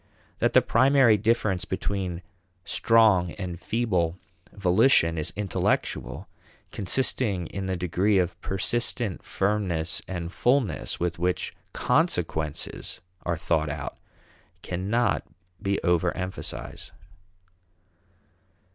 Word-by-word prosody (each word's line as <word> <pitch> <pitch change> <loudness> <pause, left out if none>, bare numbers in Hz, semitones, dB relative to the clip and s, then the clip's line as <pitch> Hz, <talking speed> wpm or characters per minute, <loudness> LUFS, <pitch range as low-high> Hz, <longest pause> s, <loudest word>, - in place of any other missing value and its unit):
That - - +2
the - - +6
primary 130 -2 +5
difference 110 -3 +1
between 95 -2 -3 0.4
strong 105 -7 +4
and 90 -3 -5
feeble 95 -7 0 0.3
volition 90 -2 +4
is 80 -2 -2
intellectual, 100 -2 -1 0.4
consisting 100 -2 +1
in 95 +3 -5
the 95 -1 -1
degree 90 +4 +1
of 90 -1 0
persistent 110 +1 -1
firmness 95 -5 -1
and 85 -1 -5
fullness 125 -3 +1
with 85 -1 -2
which 90 +1 -1 0.2
consequences 75 -2 -1 0.3
are 85 -1 0
thought 80 -2 0
out, 70 -2 -5 0.7
cannot 100 +7 0 0.4
be 100 0 0
over 85 -2 +2
emphasized. 90 -10 -6
95 Hz, 95 wpm, -26 LUFS, 85-105 Hz, 0.7 s, the